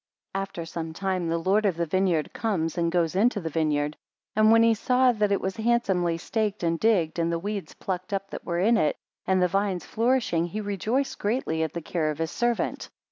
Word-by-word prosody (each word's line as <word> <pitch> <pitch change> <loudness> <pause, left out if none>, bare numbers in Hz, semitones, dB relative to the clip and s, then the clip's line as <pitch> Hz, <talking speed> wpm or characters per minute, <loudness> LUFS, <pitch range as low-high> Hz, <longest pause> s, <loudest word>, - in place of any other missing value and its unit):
14 195 - -1
After 175 -4 -7
some 165 -1 -5
time 185 -1 -1
the 165 - +1
lord 190 +6 +2
of 190 -5 +1
the 170 - 0
vineyard 175 -2 0
comes 175 -8 -1
and 170 -2 0
goes 170 -1 +1
into 215 +2 +3
the 165 -4 -4
vineyard, 150 -1 0 0.4
and 215 +1 +5
when 230 0 +6
he 230 0 +5
saw 250 +3 +3
that 210 -3 0
it 200 - +2
was 190 0 -3
handsomely 200 -7 +1
staked 210 +2 -2
and 165 -1 +1
digged, 180 -8 +2
and 165 0 +1
the 170 - 0
weeds 200 +2 -5
plucked 185 0 -4
up 195 0 -3
that - - -6
were 170 -1 -2
in 225 +5 +4
it, 155 -8 +2 0.3
and 190 0 +3
the - - +4
vines 195 0 -1
flourishing, 225 -8 +1
he 205 +5 -5
rejoiced 215 +6 -1
greatly 205 -7 -1
at 160 - -1
the 170 - -5
care 160 -2 -1
of 150 - -3
his 165 0 -2
servant. 240 0 -1
190 Hz, 220 wpm, -26 LUFS, 165-215 Hz, 0.4 s, when